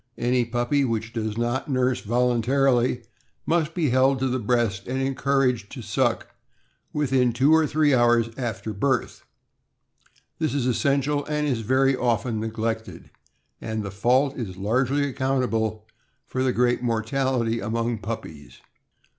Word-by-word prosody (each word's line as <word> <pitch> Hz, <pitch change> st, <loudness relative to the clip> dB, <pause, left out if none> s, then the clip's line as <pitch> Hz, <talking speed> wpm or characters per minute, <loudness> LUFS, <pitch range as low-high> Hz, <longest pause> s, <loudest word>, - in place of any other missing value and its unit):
Any 125 Hz, 0 st, +1 dB
puppy 120 Hz, +4 st, 0 dB
which 115 Hz, -2 st, -2 dB
does 110 Hz, -2 st, -3 dB
not 120 Hz, +4 st, -1 dB
nurse 130 Hz, -1 st, +1 dB
voluntarily 125 Hz, +2 st, +1 dB, 0.4 s
must 165 Hz, -1 st, 0 dB
be 160 Hz, -7 st, +1 dB
held 130 Hz, +2 st, +3 dB
to 135 Hz, +1 st, 0 dB
the 130 Hz, 0 st, -1 dB
breast 115 Hz, -4 st, 0 dB
and 130 Hz, +2 st, -2 dB
encouraged 135 Hz, -4 st, 0 dB
to 125 Hz, -, -7 dB
suck 115 Hz, +4 st, 0 dB, 0.6 s
within 130 Hz, -4 st, +1 dB
two 135 Hz, +6 st, +4 dB
or 160 Hz, -1 st, +4 dB
three 150 Hz, -1 st, +2 dB
hours 120 Hz, -2 st, +3 dB
after 110 Hz, -4 st, -4 dB
birth. 125 Hz, +5 st, -1 dB, 1.2 s
This 155 Hz, -3 st, -1 dB
essential 140 Hz, +2 st, +1 dB
is 150 Hz, -5 st, -1 dB
very 130 Hz, +4 st, +2 dB
often 120 Hz, -2 st, 0 dB
neglected, 110 Hz, 0 st, -4 dB, 0.5 s
and 110 Hz, -1 st, -3 dB
the 100 Hz, -, -5 dB
fault 125 Hz, +8 st, +2 dB
is 100 Hz, -7 st, -6 dB
largely 130 Hz, +8 st, +1 dB
accountable 125 Hz, -5 st, -1 dB, 0.4 s
for 130 Hz, -, -3 dB
the 130 Hz, -1 st, +2 dB
great 125 Hz, 0 st, +1 dB
mortality 115 Hz, 0 st, 0 dB
among 115 Hz, 0 st, -2 dB
puppies. 90 Hz, -9 st, -7 dB
125 Hz, 130 wpm, -24 LUFS, 115-135 Hz, 1.2 s, two